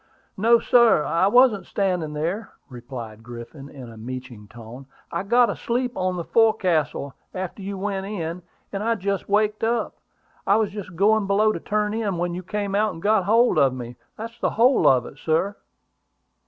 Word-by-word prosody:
"No, 230 +4 +5
sir; 235 -8 +4
I 170 +5 +2
wasn't 245 -2 +4
standing 180 -6 -1
there," 175 +8 -3 0.2
replied 120 -3 -9
Griffin, 120 +4 -10
in 135 -4 -10
a 110 - -12
meeching 125 -2 -8
tone. 120 +4 -11 0.2
"I - - -2
got 235 +5 +3
asleep 245 +1 -2
on 185 -1 -1
the 170 - -3
fo'castle 175 - +1 0.2
after 185 +2 -5
you 195 0 -5
went 195 0 -3
in; 175 -4 -4 0.3
and 195 - -3
I 230 +2 +1
just 200 -1 -3
waked 210 +1 +1
up. 230 +1 -1 0.5
I 200 - +5
was 215 -2 +1
just 195 -4 -8
going 205 +3 +3
below 210 +2 +3
to - - -4
turn 210 0 -1
in 210 -5 -2
when 175 0 -2
you 180 - -4
came 200 +2 -3
out 210 +1 +1
and - - -9
got 205 +1 +2
hold 230 +4 +4
of 135 -2 +3
me. 120 -1 -7 0.2
That's 230 +2 -8
the - - +1
whole 250 +4 +3
of 125 -3 +4
it, 135 - -12
sir." 165 +6 0
195 Hz, 180 wpm, -23 LUFS, 150-215 Hz, 0.5 s, No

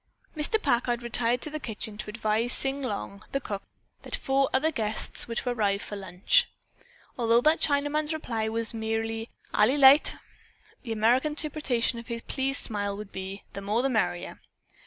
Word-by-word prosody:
Mr. 310 +8 0
Packard 240 - 0
retired 240 0 +2
to 305 - +3
the 310 - -4
kitchen 220 -4 -4
to 210 - -7
advise 220 +2 +1
Sing 270 +1 +4
Long, 205 -4 -5
the 275 - +1
cook, 200 -6 -5 0.4
that - - -3
four 270 0 +1
other 305 +5 +2
guests 220 -6 -1
were 230 - -5
to 250 - -2
arrive 200 -4 0
for 205 - -7
lunch. 195 - +2 0.7
Although 235 0 +3
that 310 +4 +3
Chinaman's 295 +1 +2
reply 230 -8 -2
was 230 +1 -1
merely 225 0 -3 0.2
"Ally 235 +6 +4
lite" 280 +1 +6 0.7
the 235 - -7
American 240 +7 +2
interpretation 275 -6 0
of 230 - -11
his 235 -1 -5
pleased 270 +1 -1
smile 205 -2 -3
would 210 -1 -9
be, 190 +1 -7
"the 200 - -6
more 210 +5 0
the 270 - +1
merrier." 90 - -1
235 Hz, 170 wpm, -27 LUFS, 215-270 Hz, 0.7 s, lite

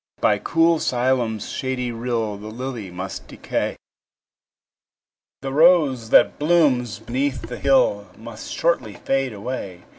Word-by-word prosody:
By 105 -1 +2
cool 165 +7 +2
Siloam's 120 -4 0
shady 130 -2 -3
rill 115 -2 -2
The 105 +1 -9
lily 120 -2 -6
must 95 +1 -7
decay; - - -3 1.7
The 135 0 -3
rose 150 -7 +4
that 120 - +5
blooms 145 -8 +2
beneath 130 +3 -2
the 120 +2 -7
hill 120 -7 +2
Must 115 0 -9
shortly 130 -11 0
fade 135 -1 -1
away. 100 -4 -6
125 Hz, 120 wpm, -22 LUFS, 110-135 Hz, 1.7 s, that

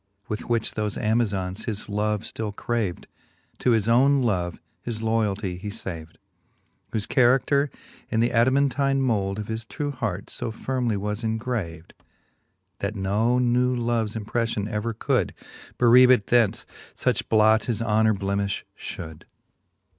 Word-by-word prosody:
With 105 +2 -5
which 115 -2 0
thofe 105 -2 -2
Amazons 105 -3 0
his 105 -2 -3
love 105 0 -1
ftill 105 -2 -4
craved. 110 -7 -2 0.5
To - - +1
his 110 -3 +3
owne 135 +3 +4
love 90 -7 -1 0.2
his 115 -2 -3
loyaltie 105 -4 0
he 105 +2 -5
faved: 85 -7 -6 0.8
Whofe 105 -2 -1
charader 135 +3 +3 0.4
in 110 - 0
th' 120 +1 +2
Adamantine 135 +3 +2
mould 105 -7 0
Of 105 0 -5
his 110 0 -4
true 145 +5 -4
hart 110 -8 -4
fo - - -4
firmly 120 -1 -1
was 105 +3 -3
engraved, 110 -8 -3 0.9
That 100 +2 -3
no 105 +5 +1
new 125 0 +2
loves 115 -3 -1
impreflion 110 -1 -2
ever 110 +1 -3
could - - 0 0.4
Bereave 125 +1 +7
it 125 -6 +5
thence: 120 -4 +2 0.3
fuch - - -1
blot 110 0 +4
his 115 -4 -1
honour 110 -1 +3
blemifh 100 0 -2
fhould. 80 -2 -8
110 Hz, 140 wpm, -25 LUFS, 100-120 Hz, 0.9 s, Bereave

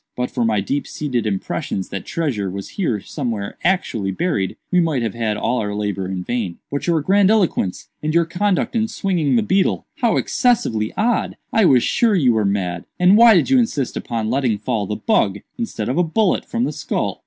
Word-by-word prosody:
But 125 0 -2
for 125 - -1
my 110 -3 +1
deep 140 +9 -2
seated 125 -7 -2
impressions 95 -1 -3
that 100 - -6
treasure 125 - -2
was 100 +1 -6
here 155 - -1
somewhere 110 -2 -4
actually 170 - 0
buried, 95 - -1
we 180 - +4
might 155 -8 +1
have 110 - -2
had 110 -3 -1
all 125 - 0
our 105 -2 -3
labor 100 -2 -2
in 95 -1 -4
vain." 105 -6 -3
"But 140 +4 -3
your 165 -3 +2
grandiloquence, 195 - +2
and 155 - -1
your 170 +1 +3
conduct 185 +6 0
in 220 -1 +1
swinging 180 -8 0
the 230 - +3
beetle—how 195 -2 0
excessively 120 - +1
odd! 235 +2 0 0.2
I 220 - +4
was 130 -7 +5
sure 230 -3 +2
you 130 -9 +3
were 110 -2 +1
mad. 90 -3 -1
And 180 +2 +6
why 230 0 +8
did 185 +9 +2
you 265 - +6
insist 150 - -1
upon 115 -2 -3
letting 125 -5 +1
fall 110 -2 -2
the 105 - -2
bug, 105 - +1 0.2
instead 230 - -3
of 130 +7 0
a - - +4
bullet, 185 +4 +1
from 235 +1 -2
the - - 0
skull?" - - -3
130 Hz, 200 wpm, -20 LUFS, -, 0.2 s, why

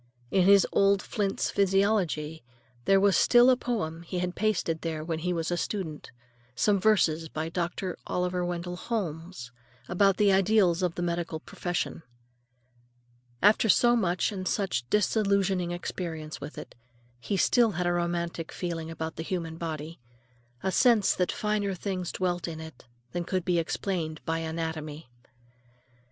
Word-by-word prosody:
In 185 -2 +3
his 200 -1 +7
old 200 0 +4
Flint's 200 0 -2
Physiology 195 - +1 0.4
there 195 0 +5
was 200 -1 +4
still 245 +6 +6
a - - +5
poem 205 -10 -3
he 170 +2 -5
had 180 0 -1
pasted 185 -6 0
there 160 -2 -3
when 160 0 -3
he 180 +3 -1
was 165 -1 -2
a 175 - 0
student; 170 -6 -4 0.5
some 200 - +2
verses 165 -6 +2
by 155 +2 -3
Dr. 175 +2 -3
Oliver 180 0 -1
Wendell 175 0 -3
Holmes 170 - -4 0.4
about 195 +2 +3
the 205 -2 +4
ideals 190 -2 +3
of 180 -2 0
the 175 - -2
medical 170 -2 -2
profession. 175 +1 -4 1.4
After 215 +2 +5
so 240 +4 +5
much 180 -3 +1
and 185 -2 -4
such 150 - -1
disillusioning 200 -3 +2
experience 165 -3 -5
with 145 +2 -8
it, - - -8 0.5
he 195 - -2
still 230 +3 +3
had 175 +1 -2
a 175 - +2
romantic 170 -1 -2
feeling 165 -2 -4
about 160 0 -5
the 160 - -3
human 165 -2 -3
body; 160 -1 -5 0.6
a 190 - 0
sense 230 -1 +4
that 180 -1 0
finer 210 -2 -1
things 185 -1 -3
dwelt 175 -2 -1
in 160 -2 -6
it 160 -6 -11 0.3
than 175 - -2
could 185 0 -2
be 175 -2 +2
explained 165 -2 -2
by 165 0 -1
anatomy. 160 -3 -5
175 Hz, 150 wpm, -28 LUFS, 165-195 Hz, 1.4 s, his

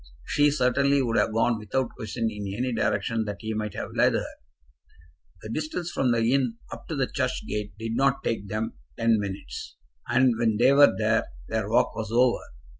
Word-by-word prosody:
She 145 0 +3
certainly 140 0 +2
would 115 -2 -1
have 115 - +2
gone 115 +1 +1
without 115 +4 -2
question 115 +1 -3
in 100 -2 -5
any 125 +1 -1
direction 110 +1 0
that 105 -1 -4
he 110 0 -3
might 105 -2 -3
have - - -5
led - - +3
her. - - -1 1.2
The 110 - -7
distance 155 +6 -3
from 130 -2 +1
the 115 -1 +2
inn 125 -4 +1 0.2
up 115 - -10
to 160 - -3
the 135 -2 +1
church 130 -1 -2
gate 105 0 -4
did 115 +1 -4
not 135 +1 +2
take 105 -3 -2
them 110 +3 -3 0.2
ten 115 -1 +3
minutes, 100 -1 -6 0.3
and 125 0 +3
when 110 -3 +2
they 125 +4 +5
were 145 +1 +7
there 110 +1 +1 0.2
their 110 -2 -1
walk 115 - +2
was 110 -2 -4
over. 120 +1 +3
115 Hz, 190 wpm, -26 LUFS, 110-130 Hz, 1.2 s, were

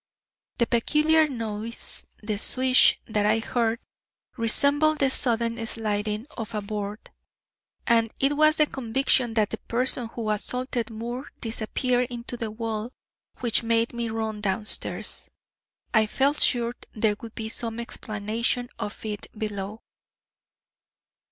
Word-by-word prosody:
The 235 - +3
peculiar 305 +7 +3
noise 230 -3 -5 0.2
the 210 -1 -2
swish 255 +3 +5
that 210 -2 +1
I 215 +1 +4
heard, 230 0 0 0.6
resembled 285 +6 +3
the 270 -2 +2
sudden 230 -2 +1
sliding 215 0 -1
of 225 -1 -5
a 210 - -1
board, 205 0 -5 0.7
and 230 -1 +3
it 275 +2 +3
was 310 +1 +5
the 305 - +5
conviction 250 -2 +1
that 215 -2 +2
the 225 - -4
person 245 0 -1
who 225 -1 -3
assaulted 245 +2 -1
Moore 240 +4 -5
disappeared 245 +2 0
into 240 0 -6
the 230 -2 -4
wall 220 +1 -4 0.5
which 235 -3 +2
made 230 0 +1
me 235 -1 -2
run 220 -1 -3
downstairs. 210 +1 0 0.6
I 220 -1 +4
felt 275 +6 +1
sure 235 -1 +3 0.2
there 215 -1 +2
would 230 -1 -9
be 220 - -4
some 230 0 -3
explanation 230 +2 -1
of 210 - -5
it 210 -1 -4
below." 210 0 -4
230 Hz, 130 wpm, -26 LUFS, 215-245 Hz, 0.7 s, swish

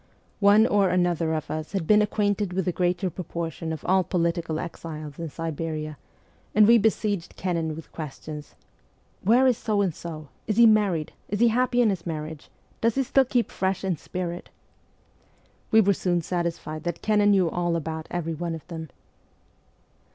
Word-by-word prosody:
One 205 +2 +6
or 200 -4 +3
another 175 -3 +1
of 155 - -4
us 155 +3 -4
had 190 -5 -1
been 210 +4 +5
acquainted 205 -2 0
with 190 -1 -1
the 180 - +1
greater 180 +1 0
proportion 165 -1 -5
of 160 - -6
all 190 0 +3
political 170 -2 -1
exiles 155 -3 -7
in 165 -1 -4
Siberia, 155 -1 -4 0.6
and 210 0 +7
we 235 0 +7
besieged 205 -4 0
Kennan 165 -4 -2
with 160 - -10
questions: 150 -1 -8 0.7
1 225 +5 +4
Where 260 - +5
is 250 -3 +3
So 215 -2 0
and 190 -5 +1
So? 155 -3 -8 0.2
Is 215 - -1
he 235 - +8
married? 205 -8 +3 0.2
Is 205 - -2
he 235 0 +5
happy 245 +1 +2
in 220 - +3
his 180 -3 -5
marriage? 155 -1 -5 0.3
Does 230 0 +2
he 270 - +2
still 265 +1 +3
keep 245 -1 0
fresh 190 0 -1
in 190 -2 0
spirit? 175 +2 -5 0.7
' - - -36
We 220 - +7
were 200 -1 +3
soon 175 -2 0
satisfied 165 -3 -3
that 175 -1 -3
Kennan 210 -1 +3
knew 190 -3 +4
all 175 -1 0
about 160 -1 -4
every 165 -2 -2
one 165 +1 -3
of 160 - -10
them. 160 -2 -6
175 Hz, 180 wpm, -25 LUFS, 160-205 Hz, 0.7 s, he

